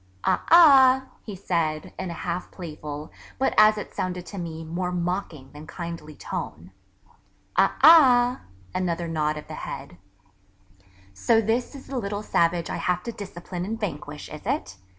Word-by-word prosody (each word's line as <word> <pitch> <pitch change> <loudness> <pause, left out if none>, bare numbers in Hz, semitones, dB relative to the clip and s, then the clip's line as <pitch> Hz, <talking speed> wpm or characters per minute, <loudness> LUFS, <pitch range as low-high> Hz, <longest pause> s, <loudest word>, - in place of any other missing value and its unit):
'Aa - - +2
ah,' 270 -6 +7 0.2
he 210 - -8
said, 165 -4 -2
in 185 - -4
a - - -4
half 175 +1 -3
playful, 150 -3 -8 0.3
but 265 - +1
as 215 0 +6
it 210 - -7
sounded 180 -1 -3
to 200 - -7
me, 165 -2 -6
more 180 +3 -3
mocking, 175 -6 -3
than 150 +1 -11
kindly 170 -3 -7
tone, - - -6 0.8
'Aa - - +3
ah' 255 -6 +7 0.3
(another 175 -2 -2
nod 155 -2 -1
of 150 - -9
the - - -8
head), - - -7 1.2
'so 225 - +3
this 225 +5 -1
is 275 - -10
the 270 -2 -4
little 205 -1 -4
Savage 170 -3 +1
I - - -4
have 180 0 -1
to 235 - -4
discipline 180 -4 -7
and 220 +4 -4
vanquish, 150 -7 -5
is 150 0 -9
it? 100 - -2
180 Hz, 160 wpm, -25 LUFS, 160-215 Hz, 1.2 s, ah